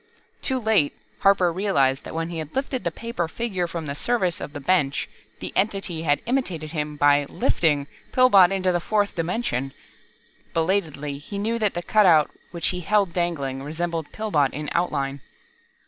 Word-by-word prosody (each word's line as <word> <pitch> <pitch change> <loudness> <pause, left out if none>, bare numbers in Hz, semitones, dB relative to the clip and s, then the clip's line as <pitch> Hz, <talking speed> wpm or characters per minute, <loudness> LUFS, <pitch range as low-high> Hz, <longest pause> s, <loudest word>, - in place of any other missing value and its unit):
Too 265 - -1
late, 220 - +2 0.3
Harper 190 -3 +4
realized 140 -9 +1
that - - -7
when 165 0 -2
he 170 -2 -4
had 155 -1 -7
lifted 270 -1 -2
the - - +1
paper 230 -7 -4
figure 185 -2 -2
from 165 -1 -5
the 140 - -3
surface 185 +1 0
of - - -5
the 145 - -6
bench, 145 -2 +1 0.3
the - - -6
Entity 195 -5 0
had 145 -3 +1
imitated 185 - -2
him 150 -2 -3
by 145 0 +4
"lifting" 145 -4 +1 0.3
Pillbot 200 -8 +6
into 190 -1 +1
the 175 - +1
fourth 205 +3 0
dimension. 165 - -2 0.8
Belatedly, 160 -5 -1
he 200 +7 -7
knew 225 +3 -1
that 210 -4 +1
the 175 - -3
cutout 175 -9 +5 0.2
which 170 -1 -1
he 180 - -3
held 195 0 +1
dangling, 145 -7 -1
resembled 165 +2 -3
Pillbot 160 -11 +1
in 150 0 -4
outline. 140 -5 -1
170 Hz, 165 wpm, -24 LUFS, 150-200 Hz, 0.8 s, Pillbot